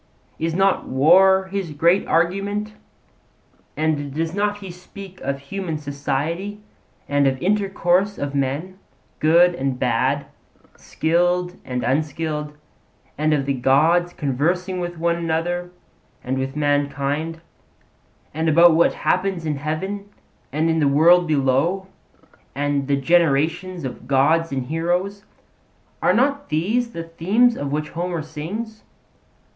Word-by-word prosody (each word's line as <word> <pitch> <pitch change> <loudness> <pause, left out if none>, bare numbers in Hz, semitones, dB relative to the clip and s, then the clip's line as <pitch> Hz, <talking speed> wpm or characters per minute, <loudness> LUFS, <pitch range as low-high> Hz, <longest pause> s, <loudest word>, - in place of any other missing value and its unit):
Is 165 0 -1
not 195 +1 +2
war 190 +8 +5
his 195 -3 -3
great 170 +6 +2
argument? 200 +5 0 1.0
and 150 -2 -1
does 165 +1 -1
he - - -8
not 205 0 0 0.2
speak 185 +1 -12
of 140 0 -2
human 160 +4 -5
society 150 +7 -3 0.5
and 145 -1 +2
of 130 -1 0
intercourse 195 +1 +1
of 140 0 -4
men, 145 +8 -2 0.4
good 170 +3 +5
and 135 -5 -2
bad, 130 +3 0 0.5
skilled 175 +2 0
and 125 -1 -4
unskilled, 150 +3 -2 0.6
and 155 +1 0
of 145 -3 +1
the 140 - 0
gods 155 +7 +3
conversing 175 +7 -1
with 175 -1 -4
one 170 +1 0
another 170 +2 -2 0.5
and 130 +1 -2
with 135 +1 -3
mankind, 145 +2 -1 0.9
and 160 +2 0
about 170 +2 +6
what 165 +1 +3
happens 185 -2 0
in 150 -2 -1
heaven 190 +8 -4 0.4
and 155 +4 0
in 160 0 +1
the 145 - +3
world 170 +5 +5
below, 150 +6 +1 0.7
and 145 -1 -1
the 140 -1 +2
generations 165 +3 +1
of 125 -1 -7
gods 150 +5 +2
and 130 -2 -2
heroes? 175 +7 -2 0.8
Are - - +4
not 280 +3 +1
these 220 +10 0
the 165 - -5
themes 195 +9 +2
of 140 -1 -4
which 150 +1 -2
Homer 170 -1 -3
sings? 200 +9 -6
165 Hz, 130 wpm, -21 LUFS, 145-180 Hz, 1.0 s, about